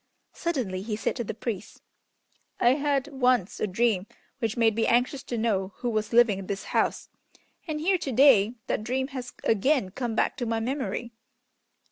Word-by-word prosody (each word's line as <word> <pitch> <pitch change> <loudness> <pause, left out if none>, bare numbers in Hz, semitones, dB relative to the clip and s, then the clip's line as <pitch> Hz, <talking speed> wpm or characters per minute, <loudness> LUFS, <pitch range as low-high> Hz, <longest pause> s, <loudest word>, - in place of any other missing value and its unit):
Suddenly 250 - -2
he 210 +1 -3
said 215 - -2
to 240 - -2
the 210 - -5
priest, 220 -3 -6 0.8
"I 240 - +5
had 280 +1 +1
once 250 -7 +1
a - - 0
dream 205 -1 +1 0.3
which 225 -2 -2
made 225 -1 +4
me 225 - +1
anxious 250 +3 +2
to 240 - -3
know 200 -4 0
who 245 - -3
was 215 -1 -1
living 230 -4 +4
in 190 - -8
this 200 -1 -3
house, - - 0 0.6
and 305 -1 -2
here 365 +4 +2
to 275 - -3
day 245 -4 +5
that - - -2
dream 260 +3 -1
has 255 -3 -6
again 225 -1 +2
come 235 +1 -3
back - - +1
to 245 - -2
my 225 0 0
memory!" 235 -2 -3
235 Hz, 180 wpm, -27 LUFS, 215-265 Hz, 0.8 s, I